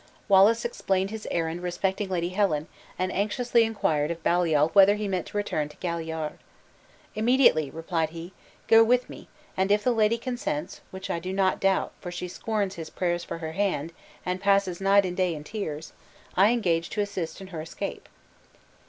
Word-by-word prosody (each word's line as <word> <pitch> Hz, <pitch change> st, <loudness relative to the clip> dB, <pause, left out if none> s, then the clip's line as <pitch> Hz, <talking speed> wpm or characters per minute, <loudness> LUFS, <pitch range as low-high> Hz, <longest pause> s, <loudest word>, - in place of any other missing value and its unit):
Wallace 215 Hz, +4 st, +5 dB
explained 195 Hz, -4 st, -1 dB
his 220 Hz, -1 st, -6 dB
errand 165 Hz, +1 st, -2 dB
respecting 190 Hz, +3 st, -2 dB
Lady 175 Hz, -2 st, -1 dB
Helen, 180 Hz, -6 st, +1 dB, 0.3 s
and 185 Hz, 0 st, -1 dB
anxiously 235 Hz, +4 st, +2 dB
inquired 160 Hz, -9 st, 0 dB
of 170 Hz, -1 st, -5 dB
Baliol 165 Hz, -3 st, +3 dB
whether 200 Hz, 0 st, +7 dB
he 210 Hz, 0 st, -3 dB
meant 185 Hz, -3 st, -2 dB
to -, -, -5 dB
return 155 Hz, -7 st, -1 dB
to -, -, -16 dB
Galliard? 160 Hz, -3 st, -4 dB, 0.7 s
"Immediately," 220 Hz, -, +3 dB
replied 165 Hz, 0 st, -2 dB
he; 170 Hz, +3 st, -9 dB, 0.3 s
"go 225 Hz, 0 st, +7 dB
with 250 Hz, +2 st, +2 dB
me, -, -, -11 dB, 0.3 s
and 190 Hz, +1 st, +1 dB
if 210 Hz, 0 st, +3 dB
the 250 Hz, -, +3 dB
lady 225 Hz, 0 st, +2 dB
consents 255 Hz, +5 st, -4 dB
(which 190 Hz, 0 st, -6 dB
I 170 Hz, -, -1 dB
do 180 Hz, +2 st, -5 dB
not 190 Hz, -1 st, +1 dB
doubt, 195 Hz, -1 st, +1 dB
for 180 Hz, -, -6 dB
she 175 Hz, +1 st, -5 dB
scorns 205 Hz, +1 st, -2 dB
his 160 Hz, -2 st, -7 dB
prayers 175 Hz, -1 st, -1 dB
for -, -, -6 dB
her 160 Hz, -1 st, -5 dB
hand, 170 Hz, -4 st, -1 dB, 0.3 s
and 180 Hz, +1 st, -2 dB
passes 195 Hz, -2 st, +2 dB
night 195 Hz, 0 st, +5 dB
and 180 Hz, -1 st, -3 dB
day 180 Hz, -3 st, +1 dB
in 150 Hz, -, -8 dB
tears), 160 Hz, -5 st, -5 dB, 0.4 s
I 195 Hz, +3 st, +6 dB
engage 170 Hz, -8 st, +1 dB
to 210 Hz, -, -1 dB
assist 195 Hz, -5 st, -4 dB
in 190 Hz, -1 st, -10 dB
her 160 Hz, -, -4 dB
escape." 160 Hz, -, -6 dB
190 Hz, 180 wpm, -26 LUFS, 170-205 Hz, 0.7 s, whether